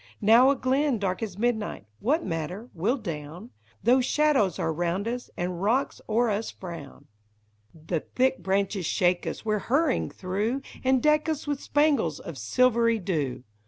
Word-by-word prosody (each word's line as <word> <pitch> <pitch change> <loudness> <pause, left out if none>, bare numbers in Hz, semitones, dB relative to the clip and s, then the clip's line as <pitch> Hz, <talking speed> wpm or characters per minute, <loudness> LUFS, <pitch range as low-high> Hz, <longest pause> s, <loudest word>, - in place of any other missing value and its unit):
Now 230 +5 +6
a 280 - +3
glen 265 +1 +1
dark 190 -1 -2
as 200 -5 -4
midnight 220 - -1
— - - -42
what 300 +9 +1
matter? 180 +7 -4
— - - -35
we 180 +6 -1
'11 250 -2 0
down 155 - -6 0.3
Though 250 +3 +5
shadows 265 - +2
are 160 - -1
round 175 +5 -1
us, 245 +1 -4
and 175 0 -3
rocks 235 +7 0
o'er 230 +1 +2
us 210 +2 -2
frown; 170 -7 -9
t) - - -24
THE - - -33
HOBSEBACK 105 0 -41 0.3
BIDE. - - -16
The - - -25
thick 260 +1 +3
branches 195 -1 0
shake 180 -2 +1
as - - -5
we 215 - +1
're 210 - +1
harrying 275 +5 +1
through, 210 +8 -2 0.2
And 260 -1 +2
deck 305 +1 +3
us 310 -2 -2
with 290 -2 -2
spangles 285 - +1
of 165 -5 -8
silvery 230 - +3
dew 155 - -2
215 Hz, 195 wpm, -26 LUFS, 175-255 Hz, 0.3 s, Now